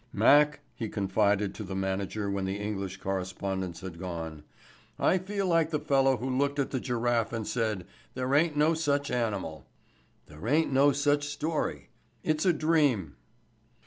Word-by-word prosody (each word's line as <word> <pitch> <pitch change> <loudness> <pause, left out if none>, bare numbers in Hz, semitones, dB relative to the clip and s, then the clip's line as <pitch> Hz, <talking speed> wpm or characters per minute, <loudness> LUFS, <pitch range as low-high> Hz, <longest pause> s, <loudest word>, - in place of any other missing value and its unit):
"Mac," 145 +8 +5
he 115 -3 -4
confided 100 0 +1
to 105 - -7
the 95 -1 -5
manager 95 +2 -2
when 100 -1 -1
the 95 +1 -2
English 100 -2 -4
correspondents 95 -1 -3
had 90 -3 -8
gone, 80 -4 -5 0.6
"I 185 - +3
feel 195 +2 -2
like 165 -3 +3
the 155 -2 -1
fellow 135 -3 +3
who 125 - -4
looked 140 +2 0
at 140 - -1
the 130 - -1
giraffe 120 -2 0
and 115 -2 -3
said 110 -7 -1 0.3
'there 130 +1 -1
ain't 150 +1 +3
no 155 +2 +4
such 145 -3 0
animal.' 100 - -2 0.6
There 75 +8 -9
ain't 150 +2 +2
no 140 +2 +5
such 145 +1 +1
story. 150 +2 -2 0.3
It's 155 +3 +1
a - - +7
dream." 145 - +2
120 Hz, 160 wpm, -29 LUFS, 95-145 Hz, 0.6 s, a